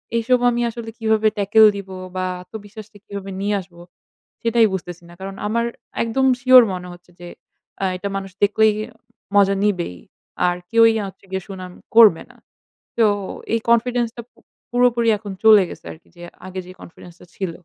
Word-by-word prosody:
এইসব 240 +2 +2
আমি 240 0 -1
আসলে 230 -1 -7
কিভাবে 220 -1 +2
ট্যাকল 210 +2 +5
দিব 195 -1 -8 0.3
বা 185 0 -1 0.2
আত্মবিশ্বাসটা 210 +2 -11
কিভাবে 200 -1 -7
নিয়ে 205 +1 0
আসব 180 -1 -19 0.7
সেটাই 230 -1 +3
বুঝতেছি 175 -2 -6
না। - - -14
কারণ 195 0 -7
আমার 235 +2 0 0.4
একদম 230 +4 0
সিওর 255 0 +8
মনে 180 0 -6
হচ্ছে 175 0 -18
যে 175 - -9 0.6
আ - - +2
এটা 200 +2 -4
মানুষ 195 -1 -7
দেখলেই 215 +1 +4 0.6
মজা 200 -1 +4
নিবেই। 175 - -1 0.5
আর 175 0 0
কেউই 230 0 +5
হচ্ছে 190 - -14
গিয়ে 190 0 -2
সুনাম 185 -2 -8 0.2
করবে 220 -8 +7
না। - - -19 0.6
তো 230 - +4 0.5
এই 230 - +2
কনফিডেন্স 240 0 +2
টা - - -5
প - - - 0.4
পুরোপুরি 240 -1 +2
এখন 205 -1 -8
চলে 215 -3 +7
গেছে - - -11
আরকি 160 - -20
যে 175 - -12 0.2
আগে 185 0 -6
যে 180 - -11
কনফিডেন্স 175 +1 -13
টা - - -14
ছিল। 190 -3 -3
205 Hz, 170 wpm, -20 LUFS, 190-230 Hz, 0.7 s, সিওর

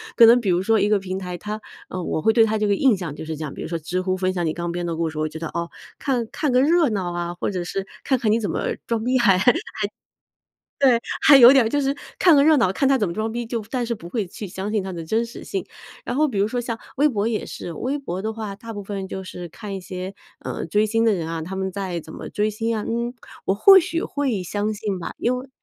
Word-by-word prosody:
可 235 - +9
能 235 +2 +7
比 205 - -1
如 180 +1 +2
说 225 +2 +3
一 205 - +2
个 210 - +4
平 190 -1 -4
台， 180 -2 -5
它 210 +4 -5 0.3
呃， 185 - -4
我 165 - -2
会 220 +8 +3
对 230 - +6
它 220 0 0
这 210 0 +1
个 205 - +3
印 250 -2 +3
象 170 -6 -5
就 - - -7
是 160 0 -4
这 155 - -5
样。 150 - -5
比 - - -8
如 - - -4
说 170 +1 -2
知 175 +3 -3
乎 185 0 -1
分 185 0 0
享 175 -2 -1
你 160 -2 0
刚 170 0 -3
编 175 +1 -3
的 165 - -2
故 165 0 -1
事， 155 -1 -5
我 155 0 0
觉 155 - -8
得 160 0 -4
哦， 170 0 -3 0.3
看 245 -5 -1
看 300 -4 -1
个 250 +1 +4
热 325 0 +4
闹 190 -5 -2
啊， 175 0 -3
或 175 - -3
者 180 -3 -2
是 195 +2 -3 0.2
看 265 - +2
看 225 -4 +1
你 225 - +3
怎 210 - -2
么 - - -1
装 230 -2 -1
逼 255 +2 +2
还 200 -6 +5
还， 190 +7 +5 1.3
对， 260 -4 +5 0.2
还 285 - +8
有 245 -1 +10
点 270 -4 +5
儿 - - 0
就 290 +4 +1
是 275 0 0 0.2
看 345 -4 +6
个 280 - +6
热 310 +1 +6
闹， 225 -8 +3
看 270 +8 +1
他 270 - +4
怎 210 -5 0
么 170 - -4
装 220 +3 -2
逼， 240 +1 -3
就 230 -1 -3
但 255 -2 0
是 235 0 -2
不 170 - -10
会 205 +1 -2
去 205 +3 -7
相 190 +3 -5
信 210 -3 0
他 190 - -5
的 170 -1 -5
真 220 +8 0
实 230 - -10
性。 390 -2 -3 0.4
然 245 - -2
后 305 +2 +3
比 235 -8 -4
如 200 +1 +3
说 245 +2 -2
像 230 -1 -4 0.2
微 295 +2 +4
博 215 -4 0
也 230 -2 -1
是， 170 - -7
微 260 - -2
博 190 -10 -5
的 220 +2 -2
话， 215 -3 -5
大 225 +3 -9
部 205 -2 -6
分 195 -1 -5
就 190 0 -6
是 180 -1 -7
看 200 +4 -7
一 190 - -6
些， 185 0 -6 0.3
呃， - - -4
追 210 +1 +2
星 225 +1 +1
的 225 - +4
人 170 -4 -3
啊， 165 0 -3
他 180 +4 -6
们 190 0 -2
在 185 -2 -3
怎 160 0 -11
么 - - -7
追 210 +1 0
星 225 +2 -1
啊。 210 - -3
嗯， 235 +1 -2 0.3
我 190 - +2
或 385 - +8
许 335 -1 -2
会 260 -10 -1
相 205 +4 -2
信 205 -3 -3
吧， 170 - -5
因 245 +2 +1
为 255 +2 -8
210 Hz, 315 characters per minute, -23 LUFS, 180-235 Hz, 1.3 s, 有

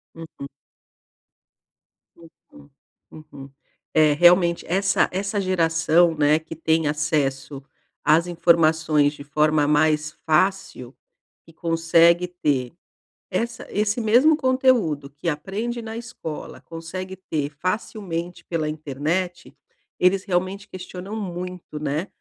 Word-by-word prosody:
Uhum. 160 -4 -9 1.7
Uhum, 160 -3 -19 0.4
uhum. 140 -3 -12 0.4
É, 155 -1 +5
realmente 175 +2 +4
essa 195 +3 +2
essa 200 +2 -2
geração, 165 -2 +2
né, 150 +1 +3
que 160 0 -10
tem 160 0 +1
acesso 145 -2 -1 0.4
às 160 +3 +4
informações 160 -3 +3
de 145 - -10
forma 150 0 +2
mais 150 +1 +2
fácil, 155 -6 0 0.5
e 165 - -17
consegue 165 +1 +3
ter 145 -8 -1 0.6
essa 235 +1 -3
esse 210 +3 0
mesmo 245 +8 +5
conteúdo 255 - +1
que 145 +4 -4
aprende 205 +10 -4
na 225 0 -7
escola, 225 -9 -8
consegue 185 +3 -7
ter 155 -6 -3
facilmente 180 +1 -4
pela 165 -3 -2
internet, 155 +4 -3 0.4
eles 185 +1 +3
realmente 190 +2 -2
questionam 185 +2 -8
muito, 180 -5 -6
né. 150 +5 -2
165 Hz, 105 wpm, -23 LUFS, 150-185 Hz, 1.7 s, É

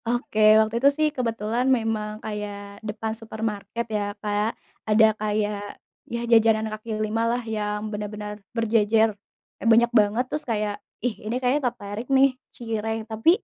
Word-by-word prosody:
Oke, 240 -2 -1 0.2
waktu 220 +1 +2
itu 280 - +7
sih 310 0 +3
kebetulan 230 0 -1
memang 220 -2 -2
kayak 205 -1 -6
depan 220 +1 -3
supermarket 220 0 -4
ya, 210 - +1 0.2
Kak, 210 +1 -1 0.3
ada 215 +1 +6 0.2
kayak 210 -1 -2 0.4
ya 235 - -1
jajanan 225 -1 +5
kaki 215 +1 -8 0.2
lima 220 +2 -1
lah, 240 +1 0
yang 210 -1 -2
benar-benar 210 0 -5 0.2
berjejer. 225 -1 +3 0.5
Kayak 230 - +2
banyak 235 +1 +4
banget, 210 +4 +2
terus 300 - -2
kayak, 210 -1 -1 0.3
"Ih, 240 -3 0
ini 220 +3 -2
kayaknya 255 +3 +1
tertarik 205 +3 -7
nih, 270 +1 +6 0.3
cireng, 225 -2 -3
tapi 225 +6 +1
220 Hz, 145 wpm, -25 LUFS, 210-230 Hz, 0.5 s, itu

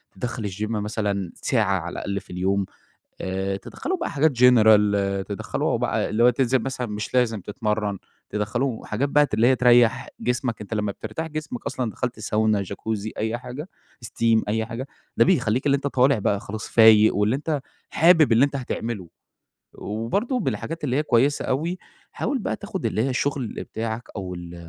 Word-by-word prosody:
داخل 115 +2 -4
الGym 105 +3 -4
مثلًا 105 -3 -2
ساعة - - +1
على - - -6
الأقل 100 0 -3
في - - -21
اليوم، 95 +2 0 0.6
آآ 95 +1 -2
تدخّلوا 365 - -4
بقى 340 - -3
حاجات 150 +3 +3
general، 110 -4 +7 0.5
تدخلوا 100 -2 -2
هو - - +1
بقى - - -1
اللي 115 +2 +2
هو 125 - +7
تنزل 130 +1 +1
مثلًا 130 -1 -3
مش 105 +1 -5
لازم 115 -4 +2
تتمرن، 105 -1 -2 0.3
تدخلوا 115 +4 -2
حاجات 125 +7 -1
بقى 150 +1 +4
ت - - -4
اللي 110 +2 +3
هي 130 +1 +4
تريح 120 0 +4
جسمك، 120 -2 -1
أنت 105 +1 -5
لما 105 -1 -1
بترتاح 110 +11 -5
جسمك 155 -6 -6
أصلًا، 125 -3 -2
دخلت 125 0 -4
ساونا، 110 -1 +1
جاكوزي، 105 +2 -4
أي 110 +2 -1
حاجة، 130 +7 -8 0.4
steam، 115 -1 +2
أي 110 +1 0
حاجة، 115 +4 -5 0.3
ده - - +6
بيخليك 130 - +1
اللي 140 - +4
أنت 140 - -5
طالع 135 -2 +3
بقى 100 0 0
خلاص 110 +2 -6
فايق، 110 -1 +6
واللي 105 +5 +2
أنت 150 0 -2 0.3
حابب 165 -5 +5
اللي 115 +4 +6
أنت 140 0 -2
هتعمله. 115 -7 -4 0.7
وبرضه 160 - -2
بالحاجات 160 - -3
اللي 130 -3 0
هي 150 - +2
كويسة 140 +2 +2
أوي، 165 +7 -1 0.3
حاول 265 +4 -2
بقى - - -2
تاخد 205 -2 -6
اللي 110 - 0
هي 135 - 0
الشغل 135 -1 -1 0.2
بتاعك، 110 +1 -4
أو 95 -3 -5
ال 85 0 -8
115 Hz, 175 wpm, -24 LUFS, 105-135 Hz, 0.7 s, general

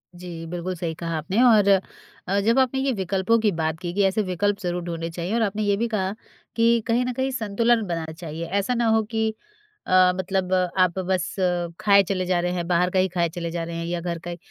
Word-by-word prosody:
जी, 175 -2 -8
बिल्कुल 175 +2 -4
सही 165 -1 -3
कहा 165 -1 -3
आपने। 190 +9 0
और 215 -5 +5 0.6
अ, 195 +2 +1
जब 230 +6 +3
आपने 265 0 +2
ये 270 0 +1
विकल्पों 195 +3 +1
की 215 -2 +2
बात 160 -2 -2
की 175 - -4
कि 200 - +2
ऐसे 195 +3 +1
विकल्प 200 +2 -1
ज़रूर 175 0 -2
ढूँढ़ने 165 -1 -4
चाहिए 175 +4 -4
और 235 - +1
आपने 215 0 0
ये 205 -1 +2
भी 235 +2 0
कहा 195 -4 -1 0.4
कि 230 0 +4
कहीं 240 +2 +2
न 250 - -2
कहीं 265 +2 -1
संतुलन 230 0 +1
बनाना 165 -2 -3
चाहिए। 165 -1 -6
ऐसा 200 +7 -1
ना 235 -1 0
हो 220 0 +4
कि 220 0 -1 0.5
अ, 185 0 +5
मतलब 185 0 -1 0.3
आप 185 0 +3
बस 185 -1 -1 0.4
खाए 200 -1 +5
चले 185 -2 0
जा 180 -1 +1
रहे 180 +1 -1
हैं, 175 -1 -3
बाहर 180 0 +2
का 185 0 +1
ही 185 - +3
खाए 170 -2 +2
चले 170 0 -5
जा 170 0 -3
रहे 165 0 -6
हैं 165 0 -3
या 170 0 -2
घर 170 -1 -3
का 175 +1 -7
ही। 170 - -6
185 Hz, 235 wpm, -24 LUFS, 170-215 Hz, 0.6 s, और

